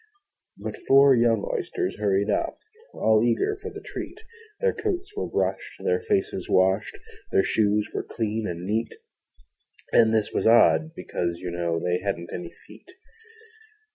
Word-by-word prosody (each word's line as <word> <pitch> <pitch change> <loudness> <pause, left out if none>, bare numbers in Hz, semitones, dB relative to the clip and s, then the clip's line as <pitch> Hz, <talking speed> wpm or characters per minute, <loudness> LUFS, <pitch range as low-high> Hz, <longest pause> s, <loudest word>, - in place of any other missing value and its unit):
Out - - -4
four 140 0 +7
young 115 -4 +2
Oysters - - -3
hurried 100 0 +1
up. - - -1 0.4
All 110 0 +3
eager 120 - +1
for 440 - -5
the 410 -1 -10
treat: - - -7 0.4
Their 480 -1 +2
coats 420 -2 -3
were 420 - -2
brushed, - - -2
their 460 -1 +1
faces 415 -2 -1
washed, 95 - +2 0.3
Their 395 -1 +4
shoes 105 -1 +1
were - - -1
clean 110 -1 -3
and 85 0 -5
neat 110 +4 -2 1.0
And 115 -1 +5
this 110 -2 +1
was - - +1
odd, 80 -9 +5
because, 85 -1 -3
you 90 0 -5
know, 85 -1 -1
They 90 +1 0
hadn't 85 -3 -4
any 85 -1 -6
feet. - - -16
110 Hz, 150 wpm, -25 LUFS, -, 1.0 s, four